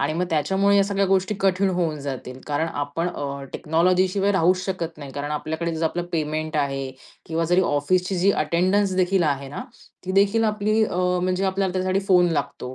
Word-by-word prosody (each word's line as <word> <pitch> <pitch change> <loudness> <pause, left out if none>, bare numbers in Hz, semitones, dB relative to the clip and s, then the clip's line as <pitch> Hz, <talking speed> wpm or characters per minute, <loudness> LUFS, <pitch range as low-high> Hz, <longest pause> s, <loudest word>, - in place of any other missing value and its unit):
आणि 140 +3 0
मग 180 - 0
त्याच्यामुळे 190 +6 +2
या 200 - +5
सगळ्या 200 0 0
गोष्टी 190 +2 +1
कठीण 195 0 +2
होऊन 165 -4 -1
जातील. 130 -2 -6
कारण 150 +2 0
आपण 145 +3 -3
अ, 140 -4 -5
टेक्नॉलॉजी 180 +4 +2
शिवाय 200 +2 +1
राहूच 185 -1 +3
शकत 170 -4 -4
नाही. 140 -2 -8
कारण 145 +1 -4
आपल्याकडे 160 +2 -3
जर 160 - -1
आपलं 175 +2 -1
पेमेंट 155 0 -2
आहे. 135 -2 -1 0.4
किंवा 165 +1 -1
जरी 175 +3 +3
ऑफिसची 180 +6 0
जी 190 +3 +4
अटेंडन्स 185 +5 +1
देखील 185 0 +2
आहे 140 -3 -1
ना, 145 - -6 0.4
ती 185 - -3
देखील 200 +3 +3
आपली 215 0 +1
अ, 180 - -4 0.3
म्हणजे 185 +1 0
आपल्याला 190 -1 0
त्यासाठी 185 +1 0
फोन 180 -2 +5
लागतो, 135 -4 -3
175 Hz, 190 wpm, -23 LUFS, 150-190 Hz, 0.4 s, या